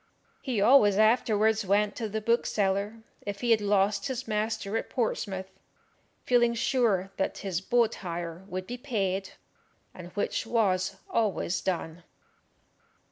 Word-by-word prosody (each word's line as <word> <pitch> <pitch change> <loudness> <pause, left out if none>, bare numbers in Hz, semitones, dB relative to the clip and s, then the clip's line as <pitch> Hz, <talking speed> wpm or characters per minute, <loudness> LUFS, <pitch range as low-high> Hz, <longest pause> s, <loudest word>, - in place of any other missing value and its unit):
He 250 -6 -2
always 205 -3 +6
afterwards 220 -1 +3
went 205 +2 +1
to 225 -3 -3
the 220 +1 -3
bookseller, 210 -1 0 0.2
if 200 -1 -6
he 240 -1 +1
had 220 -2 +4
lost 200 0 +1
his 255 -2 -4
master 215 -1 -2
at 225 - -2
Portsmouth, 195 -5 -2 0.7
feeling 240 -1 +3
sure 220 -6 +1
that 190 - -1
his 185 -2 -1
boat 235 +3 +2
hire 170 -1 -6
would 185 -1 -5
be 245 +5 -6
paid, 195 -7 -2 0.6
and 180 -1 -9
which 205 - -2
was 195 -5 +1 0.2
always 205 -5 0
done. 175 -2 -3
210 Hz, 135 wpm, -28 LUFS, 190-230 Hz, 0.7 s, always